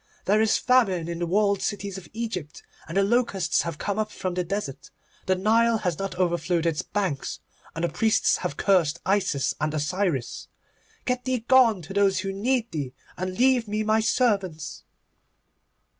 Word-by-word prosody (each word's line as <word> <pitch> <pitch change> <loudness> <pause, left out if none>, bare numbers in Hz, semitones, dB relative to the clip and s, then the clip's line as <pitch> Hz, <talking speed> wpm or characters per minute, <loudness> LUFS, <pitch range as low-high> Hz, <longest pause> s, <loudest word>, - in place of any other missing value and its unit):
There 210 +3 +3
is 220 -1 +3
famine 195 -10 +2
in 170 0 -4
the 175 - -1
walled 200 +1 +2
cities 200 -1 -3
of 190 -2 -9
Egypt, 220 -9 -5 0.2
and 165 +4 -4
the 195 - +4
locusts 200 -5 +1
have 170 -3 -4
come 200 +5 -2
up 215 0 -1
from 185 -1 -3
the 180 0 -1
desert. 175 -6 -5 0.4
The 190 - +3
Nile 225 +4 +3
has 180 -6 -2
not 195 -1 -3
overflowed 175 -1 0
its 165 -2 +1
banks, 185 -10 -3 0.4
and 165 - -3
the 170 - +1
priests 215 +7 +2
have 145 - -4
cursed 170 -5 +2
Isis 190 -8 +1
and 150 0 +1
Osiris. 155 -3 -2 0.6
Get 250 -1 -1
thee 255 -2 0
gone 235 -8 +5
to 160 - -8
those 195 -2 +2
who 195 0 -3
need 235 +3 0
thee, 140 -5 -4 0.2
and 185 +1 -4
leave 250 -2 +3
me 210 +1 -1
my 215 +1 +2
servants. 200 - 0
195 Hz, 175 wpm, -25 LUFS, 170-220 Hz, 0.6 s, gone